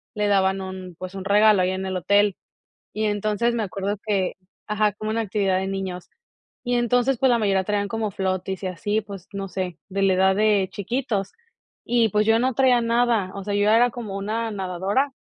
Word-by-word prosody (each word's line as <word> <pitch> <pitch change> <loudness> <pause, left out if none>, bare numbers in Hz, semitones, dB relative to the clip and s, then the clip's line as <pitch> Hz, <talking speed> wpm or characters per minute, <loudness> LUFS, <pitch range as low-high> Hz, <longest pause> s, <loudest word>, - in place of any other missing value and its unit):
le 210 -1 0
daban 190 -1 +2
un, 185 -1 -7
pues, 185 +1 -8
un 190 - -5
regalo 210 0 +5
ahí 180 0 +1
en 190 0 -3
el 190 -1 -2
hotel. 200 +2 +3 0.6
Y 215 - -1
entonces 210 +3 0
me 230 - -1
acuerdo 200 +1 -3
que 195 -3 0 0.3
ajá, 210 0 +1
como 215 +2 -5
una 225 +1 0
actividad 195 -3 0
de 190 - -2
niños. 190 -2 -4 0.6
Y 245 -1 +1
entonces, 245 +2 +2
pues, 265 - +3
la 240 - +3
mayoría 195 -3 +1
traían 205 0 -1
como 220 0 -2
floaties 190 0 -2
y - - -1
así, 205 +5 -1
pues, 200 -3 -10
no 195 -1 -4
sé, 180 -2 -4
de 195 +1 -1
la 195 -1 +4
edad 190 +1 +3
de 205 -2 +3
chiquitos 210 -2 -2 0.5
y, 235 -1 +2
pues, 210 +2 +2
yo 225 0 +4
no 255 +2 +1
traía 255 -2 +4
nada, 230 -4 +1
o 200 -1 -6
sea, 205 - -3
yo 205 +1 +2
era 240 +3 +5
como 220 -4 -6
una 220 +3 -2
nadadora 195 +8 -1
205 Hz, 205 wpm, -23 LUFS, 190-225 Hz, 0.6 s, regalo